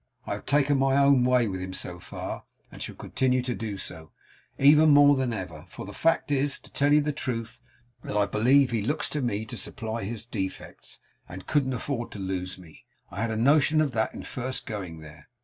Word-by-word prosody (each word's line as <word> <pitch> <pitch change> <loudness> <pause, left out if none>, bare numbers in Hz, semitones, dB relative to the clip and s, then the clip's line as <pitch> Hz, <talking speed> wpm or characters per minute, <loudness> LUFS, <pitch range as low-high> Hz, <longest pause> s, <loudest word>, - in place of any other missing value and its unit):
I - - -2
have - - -8
taken 140 -1 +3
my 135 0 +3
own 140 -2 +5
way 125 -2 +3
with 95 -2 -4
him 95 0 -5
so 90 -1 -4
far, - - -6 0.3
and - - -11
shall - - -5
continue 130 -1 0
to 125 -1 -2
do 110 -4 -4
so, 80 -4 -6 0.5
even 150 +3 +6
more 145 0 +7
than 130 -2 0
ever; 90 -7 -6
for 90 - -9
the 100 - -9
fact 165 +4 +1
is, 140 0 +1
to - - -17
tell 145 +1 +2
you 150 0 +6
the 150 +1 -1
truth, 120 -4 -4 0.4
that 105 - -4
I 105 - +4
believe 125 +6 +3
he 115 -2 0
looks 145 +8 -1
to 150 - -2
me 110 -3 -1
to 105 - -8
supply 115 -2 -4
his 115 +2 -5
defects, 100 -5 -6 0.3
and 90 +2 -9
couldn't 140 -4 +1
afford 120 0 -3
to - - -8
lose 95 -1 -4
me. 85 -4 -15 0.3
I 100 - -5
had 115 - 0
a 110 - -2
notion 145 +5 +4
of 155 -3 +2
that 110 -2 -1
in - - -7
first 130 +1 -4
going 90 -7 -6
there. 75 0 -14
120 Hz, 220 wpm, -27 LUFS, 100-140 Hz, 0.5 s, more